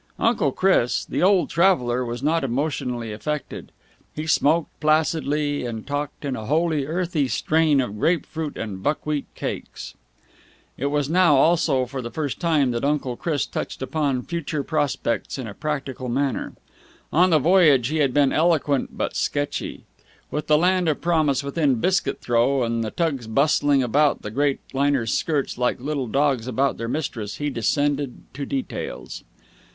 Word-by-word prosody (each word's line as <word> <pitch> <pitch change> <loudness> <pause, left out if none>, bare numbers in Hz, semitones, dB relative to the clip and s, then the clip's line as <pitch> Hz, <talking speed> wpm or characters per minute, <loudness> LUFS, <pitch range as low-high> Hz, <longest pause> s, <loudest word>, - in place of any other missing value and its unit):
Uncle 220 - +2
Chris, 185 -8 +2
the - - -2
old 190 0 +4
traveller, 130 -9 +2
was 120 +1 -5
not 160 +1 +1
emotionally 125 -4 -2
affected. 150 +7 -5 0.4
He 155 - -4
smoked 160 +1 +1
placidly 150 -2 +1
and 115 -3 -5
talked 145 +1 -4
in 135 -2 -2
a 110 -3 -6
wholly 155 -2 +1
earthy 165 -3 0
strain 155 +1 +2
of 105 -5 -2
grape 165 +3 +2
fruit 160 -2 -5
and 100 -4 -5
buckwheat 150 +1 -1
cakes. - - -6 0.8
It 140 - -2
was 145 -1 0
now, 170 -1 +4
also 140 -3 +3
for 130 +1 -5
the 120 - -5
first 145 +3 -3
time, 155 -7 +2
that 120 -1 -3
Uncle 140 -3 0
Chris 150 +1 -1
touched - - -5
upon 135 -3 -1
future 155 -4 -3
prospects 145 -6 -1
in 130 - -5
a 105 - -7
practical 135 -3 -4
manner. 135 +2 -1 0.6
On 180 +4 +5
the 160 - +5
voyage 150 -5 +4
he 155 - -1
had 140 -4 +2
been 140 0 +3
eloquent 155 -4 +1
but - - -2
sketchy. 145 0 -2 0.5
With 150 - -3
the 150 - +5
land 180 +1 +2
of 150 - 0
promise 155 -6 +1
within 140 -1 +1
biscuit 185 +11 0
throw 120 +3 +2
and 115 -1 -1
the 110 - -2
tugs 140 -5 -2
bustling 140 +3 +3
about 145 +5 +2
the 105 - -5
great 140 +3 0
liner's 135 -4 +1
skirts 145 -5 -1
like 125 0 +1
little 140 -1 -2
dogs 135 -1 +1
about 135 +3 0
their 115 - -3
mistress, 120 -8 -3
he 145 0 -2
descended 140 +3 -1
to 140 +1 -5
details. 135 -2 -5
145 Hz, 160 wpm, -23 LUFS, 130-155 Hz, 0.8 s, On